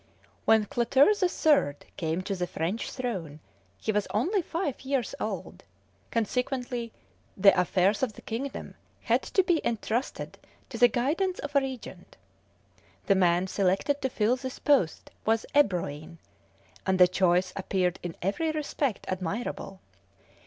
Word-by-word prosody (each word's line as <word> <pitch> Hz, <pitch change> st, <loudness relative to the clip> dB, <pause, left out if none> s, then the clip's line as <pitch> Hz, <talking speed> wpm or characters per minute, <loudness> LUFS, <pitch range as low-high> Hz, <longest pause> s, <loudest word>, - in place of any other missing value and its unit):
When 220 Hz, -1 st, +5 dB
Clotaire 260 Hz, -, +4 dB
the 375 Hz, -3 st, +1 dB
Third 280 Hz, -, +2 dB
came 165 Hz, +1 st, -2 dB
to 195 Hz, -, -2 dB
the 180 Hz, -1 st, -2 dB
French 175 Hz, +9 st, -3 dB
throne 185 Hz, -, -4 dB, 0.4 s
he 220 Hz, -, -1 dB
was 210 Hz, -1 st, 0 dB
only 350 Hz, -, +1 dB
five 330 Hz, -4 st, -3 dB
years 265 Hz, -2 st, -1 dB
old; -, -, -5 dB, 0.5 s
consequently 245 Hz, +1 st, -2 dB, 0.5 s
the 195 Hz, +1 st, +7 dB
affairs 185 Hz, +3 st, +2 dB
of 250 Hz, -5 st, 0 dB
the -, -, -14 dB
kingdom 255 Hz, +5 st, -5 dB, 0.3 s
had -, -, +2 dB
to 380 Hz, -, +1 dB
be 345 Hz, -3 st, +2 dB
entrusted 235 Hz, +2 st, -2 dB, 0.3 s
to -, -, -6 dB
the 245 Hz, -, +8 dB
guidance 310 Hz, -, 0 dB
of 290 Hz, 0 st, -6 dB
a -, -, +7 dB
regent. 265 Hz, -2 st, -7 dB, 0.9 s
The 195 Hz, -, +4 dB
man 180 Hz, -1 st, +3 dB
selected 195 Hz, +9 st, 0 dB
to 265 Hz, -, 0 dB
fill 235 Hz, +1 st, +1 dB
this 260 Hz, 0 st, -6 dB
post 270 Hz, -, +1 dB
was 225 Hz, 0 st, +1 dB
Ebroin, 170 Hz, -, +1 dB, 0.7 s
and 190 Hz, -1 st, +1 dB
the 180 Hz, -1 st, +8 dB
choice 180 Hz, 0 st, +2 dB
appeared 185 Hz, -2 st, 0 dB
in 175 Hz, -2 st, -5 dB
every 205 Hz, -, 0 dB
respect 290 Hz, -6 st, -2 dB
admirable. 185 Hz, +1 st, -4 dB
220 Hz, 140 wpm, -28 LUFS, 185-270 Hz, 0.9 s, the